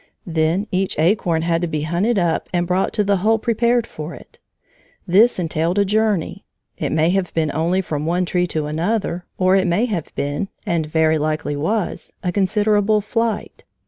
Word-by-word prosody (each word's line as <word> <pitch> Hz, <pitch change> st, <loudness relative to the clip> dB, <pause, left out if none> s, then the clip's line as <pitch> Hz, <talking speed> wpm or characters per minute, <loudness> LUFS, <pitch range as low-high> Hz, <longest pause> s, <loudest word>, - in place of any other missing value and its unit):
Then 165 Hz, +3 st, 0 dB
each 190 Hz, 0 st, -1 dB
acorn 165 Hz, -1 st, +2 dB
had 165 Hz, 0 st, +1 dB
to 175 Hz, -, 0 dB
be 155 Hz, -2 st, -2 dB
hunted 180 Hz, +9 st, 0 dB
up 170 Hz, -3 st, 0 dB
and 175 Hz, -1 st, 0 dB
brought 180 Hz, +2 st, 0 dB
to 210 Hz, -, +1 dB
the 200 Hz, 0 st, +2 dB
hole 220 Hz, +4 st, +2 dB
prepared 235 Hz, +1 st, +1 dB
for 155 Hz, -3 st, -7 dB
it. -, -, -16 dB, 0.7 s
This 210 Hz, +7 st, +5 dB
entailed 165 Hz, +1 st, -1 dB
a 200 Hz, -, +4 dB
journey, 210 Hz, -3 st, 0 dB, 0.3 s
it -, -, -3 dB
may 160 Hz, +2 st, +2 dB
have 190 Hz, -1 st, 0 dB
been 155 Hz, -2 st, +1 dB
only 170 Hz, +5 st, +1 dB
from 155 Hz, -4 st, -3 dB
one 180 Hz, +2 st, +1 dB
tree 180 Hz, 0 st, 0 dB
to 155 Hz, -3 st, -2 dB
another, 175 Hz, +3 st, -2 dB
or 185 Hz, 0 st, +3 dB
it 190 Hz, -1 st, +2 dB
may 175 Hz, +7 st, +2 dB
have 200 Hz, -10 st, -3 dB
been, 145 Hz, +7 st, -2 dB, 0.2 s
and 165 Hz, -3 st, 0 dB
very 160 Hz, 0 st, +2 dB
likely 155 Hz, -1 st, -1 dB
was, 180 Hz, +8 st, -2 dB
a 180 Hz, -, 0 dB
considerable 205 Hz, +2 st, +2 dB
flight. 225 Hz, +1 st, -2 dB
180 Hz, 180 wpm, -20 LUFS, 160-205 Hz, 0.7 s, This